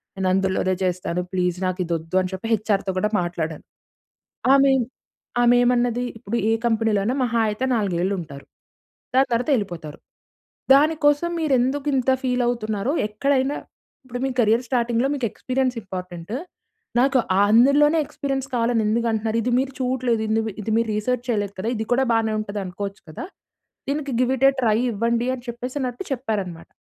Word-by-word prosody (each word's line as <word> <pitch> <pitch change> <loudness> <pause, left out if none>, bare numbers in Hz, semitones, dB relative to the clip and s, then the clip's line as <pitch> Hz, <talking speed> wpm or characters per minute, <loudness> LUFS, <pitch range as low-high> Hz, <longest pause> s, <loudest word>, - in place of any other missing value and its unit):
నేను 190 -1 0
అందులోనే 190 -1 +1
చేస్తాను 180 -1 -1
ప్లీజ్ 180 -1 0
నాకు 185 +1 -3
ఇది 170 0 -1
ఒద్దు", 165 +3 -8
అని 185 - -4
చెప్పి 190 +4 -5
హెచ్ఆర్‌తో 200 -3 0
కూడా 210 +2 0
మాట్లాడాను. 165 -3 -4 0.9
ఆమెమ్ 270 -3 +4 0.6
ఆమె‌మన్నది 245 0 +3 0.2
"ఇప్పుడు 235 0 -3
ఏ - - +4
కంపెనీలోనైనా 225 +1 +1
మహా 235 -1 0
అయితే 215 +5 -2
నాలుగేలుంటారు. 175 -7 -2 0.7
దాని 265 +1 +5
తర్వాత 240 +5 0
ఎళ్ళిపోతారు! 170 -7 -5 0.8
దానికోసం 295 +2 +3
మీరు 305 -4 +1
ఎందుకు 275 +4 -1
ఇంత 265 0 +2
ఫీలావుతున్నారో? 240 -2 0 0.2
ఎక్కడైనా 270 +5 0 0.5
ఇప్పుడు 245 -1 -6
మీ - - 0
కేరియర్ 225 +2 +3
స్టార్టింగ్‌లో 240 0 +1
మీకు 255 -4 -2
ఎక్స్‌పి‌రియన్స్ 255 -1 -1
ఇంపార్టెంటు. 180 +1 -6 0.6
నాకు 265 0 +4 0.3
అందులోనే 280 +8 +5
ఎక్స్‌పి‌రియన్స్ 270 -1 -3
కావాలని 230 -1 +1
ఎందుకు 230 +2 +1
అంటున్నారు? 220 +1 0
ఇది 250 - 0
మీరు 270 0 -2
చూడట్లేదు. 250 -3 0
ఇందుమీ 220 -1 0
ఇది 220 - -3
మీరు 230 -1 +1
రిసర్చ్ 245 +3 -1
చేయలేదు 205 -3 -1
కదా? 220 +4 -1
ఇది 220 0 -3
కూడా 265 +1 +2
బానే 220 -1 +1
ఉంటది 205 -1 -4
అనుకోవచ్చు 195 +2 -6
కదా! 155 - -6 0.6
దీనికి 285 -2 -2
గివ్ 255 +1 +2
ఇట్ 270 - +3
ఎ - - +1
ట్రై 220 -2 +3
ఇవ్వండి", 235 +3 0
అని 245 0 -12
చెప్పేసినట్టు 250 +5 -4
చెప్పారు 220 -6 -2
అన్నమాట. 170 -2 -10
230 Hz, 150 wpm, -23 LUFS, 200-255 Hz, 0.9 s, దాని